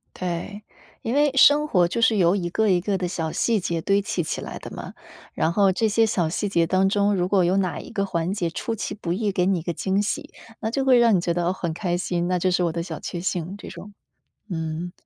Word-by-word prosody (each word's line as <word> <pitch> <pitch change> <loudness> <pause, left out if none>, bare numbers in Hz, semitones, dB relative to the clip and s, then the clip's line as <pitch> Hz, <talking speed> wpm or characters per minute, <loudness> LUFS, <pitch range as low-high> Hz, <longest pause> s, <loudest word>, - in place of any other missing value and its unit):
对。 185 +4 -4 0.4
因 230 - -2
为 290 +1 +4
生 290 +3 +6
活 180 -9 +3
就 235 - -2
是 225 -1 +4
由 175 -2 +4
一 175 -4 -1
个 220 +4 +1
一 180 -2 +4
个 195 +2 -1
的 180 -1 -2
小 165 -3 -2
细 230 -3 +1
节 170 -2 -2
堆 200 +3 +2
砌 195 -4 -2
起 - - -3
来 - - -7
的 - - -9
嘛， - - -8 0.4
然 160 - 0
后 200 +2 +3
这 220 +4 +1
些 225 +2 +3
小 180 -7 0
细 205 +5 -2
节 170 -4 +2
当 190 +2 +2
中， 205 +1 +2
如 180 -2 0
果 190 -2 +3
有 180 +3 +2
哪 185 -3 0
一 - - -8
个 200 -1 -1
环 170 -1 -2
节 175 -5 -1
出 225 +7 -4
其 215 - -4
不 170 -5 -4
意 210 +3 0
给 180 -2 +1
你 190 -2 +2
一 - - -7
个 170 +1 -3
惊 195 +4 0
喜， 290 +8 -3 0.3
那 220 - -2
就 270 +1 -1
会 260 -2 +6
让 235 -2 +5
你 185 - +4
觉 170 0 -1
得 175 0 0
很 170 -3 -3
开 175 0 -1
心， 175 -1 -2
那 180 -1 +1
就 185 - +1
是 180 0 +1
我 170 - +1
的 170 +1 -3
小 165 -3 -7
确 175 - -5
幸， 180 +1 -3
这 - - -11
种。 205 0 -10 0.6
嗯， 160 0 -4
185 Hz, 280 characters per minute, -24 LUFS, 175-205 Hz, 0.6 s, 生